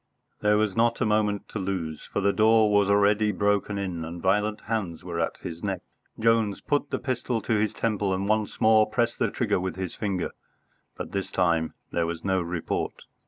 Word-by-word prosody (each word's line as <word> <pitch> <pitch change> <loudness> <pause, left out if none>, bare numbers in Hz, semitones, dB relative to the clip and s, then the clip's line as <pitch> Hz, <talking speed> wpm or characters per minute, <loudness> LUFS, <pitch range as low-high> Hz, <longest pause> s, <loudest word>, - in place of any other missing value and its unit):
There 105 0 +3
was 105 -3 +1
not 115 0 +2
a 130 - +2
moment 105 -1 +1
to 105 - -4
lose, 90 -5 -4
for - - 0
the 100 0 +2
door 110 0 +4
was 100 -1 +4
already 105 +1 +4
broken 100 +1 0
in 90 -4 -3
and 85 +2 -6
violent 105 +4 +1
hands 105 -7 -3
were 85 -2 -4
at 80 - -1
his 85 0 -6
neck. 95 -3 -2 0.4
Jones 110 -2 +2
put 145 -1 -1
the - - -1
pistol 125 -2 -2
to 110 -2 +1
his 105 0 +1
temple 105 -3 0
and 95 +1 -1
once 110 -1 0
more 110 -1 +5
pressed 120 +1 0
the - - +2
trigger 105 -6 0
with 95 +1 -3
his 95 -2 -4
finger. 100 -4 -2 0.7
But - - -6
this 100 -1 -3
time 85 -3 +1 0.2
there 85 -1 0
was 85 +1 -5
no 95 -1 +2
report. 85 -1 -3
100 Hz, 200 wpm, -26 LUFS, 95-110 Hz, 0.7 s, more